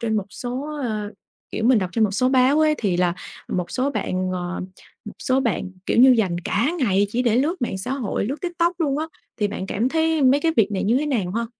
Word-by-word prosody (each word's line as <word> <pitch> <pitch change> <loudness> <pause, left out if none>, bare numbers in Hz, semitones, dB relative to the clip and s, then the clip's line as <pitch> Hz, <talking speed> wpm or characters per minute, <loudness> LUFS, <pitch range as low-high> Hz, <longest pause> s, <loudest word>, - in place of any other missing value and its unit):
trên 220 -2 0
một 205 - -1
số, 270 +4 -5
à, 215 -4 -3 0.4
kiểu, 220 - -3
mình 245 0 +5
đọc 185 -3 -2
trên 220 +4 +3
một 210 - +1
số 230 +6 +1
báo 260 +3 +4
ấy, 310 -1 +4
thì 195 -5 0
là 175 -1 +1 0.3
một 180 -1 -2
số 265 +2 0
bạn, 185 -8 -2
ờ, 180 0 -3 0.4
một 210 - -8
số 260 +1 +1
bạn 195 -7 -1 0.2
kiểu - - +1
như 260 +2 +8
dành 185 -5 +1
cả 235 +8 +1
ngày 205 - +2
chỉ 245 +3 0
để 235 -2 +2
lướt 300 +5 0
mạng 190 - -2
xã 245 +7 -4
hội, 255 -8 -2
lướt 275 +6 -4
TikTok 345 0 -1
luôn 285 -3 +1
á, 315 - -2 0.3
thì 210 - 0
bạn 195 -2 -5
cảm 220 +6 0
thấy 320 +1 +1
mấy 270 +2 +5
cái 325 +2 +1
việc 215 -2 +3
này 190 - -1
như 225 +5 +3
thế 300 +3 0
nào 220 -11 -1
ha? 230 +2 -1
240 Hz, 250 wpm, -22 LUFS, 200-280 Hz, 0.4 s, như